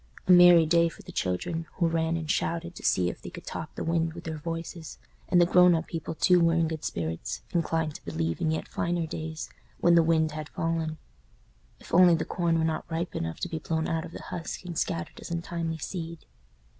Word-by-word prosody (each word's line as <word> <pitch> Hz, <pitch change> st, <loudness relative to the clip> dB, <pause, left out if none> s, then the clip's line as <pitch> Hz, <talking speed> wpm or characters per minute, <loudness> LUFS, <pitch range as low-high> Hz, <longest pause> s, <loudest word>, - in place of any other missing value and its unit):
A -, -, +3 dB
merry 175 Hz, -2 st, +8 dB
day 170 Hz, +1 st, +4 dB
for -, -, -14 dB
the -, -, -10 dB
children, 160 Hz, -, -2 dB
who 170 Hz, -, +2 dB
ran 165 Hz, 0 st, 0 dB
and 160 Hz, -1 st, -5 dB
shouted 170 Hz, +2 st, -1 dB
to -, -, -11 dB
see 90 Hz, -1 st, +2 dB
if -, -, -5 dB
they -, -, -7 dB
could -, -, -10 dB
top -, -, -6 dB
the -, -, -4 dB
wind 165 Hz, -1 st, 0 dB
with 170 Hz, +1 st, -9 dB
their 160 Hz, -1 st, -5 dB
voices; 165 Hz, 0 st, -6 dB, 0.3 s
and 175 Hz, -, +5 dB
the 175 Hz, -, +6 dB
grown 180 Hz, 0 st, +6 dB
up 160 Hz, 0 st, -1 dB
people 165 Hz, -1 st, -5 dB
too 180 Hz, +2 st, +4 dB
were 165 Hz, -1 st, +3 dB
in 165 Hz, -1 st, +2 dB
good 160 Hz, -1 st, -5 dB
spirits, 80 Hz, -1 st, -4 dB
inclined 165 Hz, -2 st, 0 dB
to -, -, -11 dB
believe 80 Hz, 0 st, -2 dB
in 160 Hz, -, +1 dB
yet 160 Hz, -, -2 dB
finer 170 Hz, -1 st, -1 dB
days, 160 Hz, 0 st, -6 dB, 0.3 s
when 175 Hz, -, +4 dB
the 170 Hz, -, +7 dB
wind 160 Hz, -1 st, +2 dB
had 155 Hz, -1 st, -6 dB
fallen. 165 Hz, -1 st, -2 dB, 0.8 s
If -, -, -14 dB
only 175 Hz, 0 st, +7 dB
the 160 Hz, -, -2 dB
corn 170 Hz, -2 st, 0 dB
were 160 Hz, -, +1 dB
not 160 Hz, +1 st, -2 dB
ripe 165 Hz, +1 st, -3 dB
enough 80 Hz, 0 st, -3 dB
to -, -, -1 dB
be 165 Hz, -2 st, -4 dB
blown 160 Hz, +1 st, -1 dB
out 165 Hz, -1 st, -1 dB
of 170 Hz, -, -8 dB
the -, -, -9 dB
husk 170 Hz, +2 st, -6 dB
and 175 Hz, -1 st, -6 dB
scattered 85 Hz, -, -2 dB
as -, -, -8 dB
untimely 170 Hz, -1 st, -3 dB
seed! 165 Hz, +1 st, -6 dB
165 Hz, 225 wpm, -28 LUFS, 160-170 Hz, 0.8 s, merry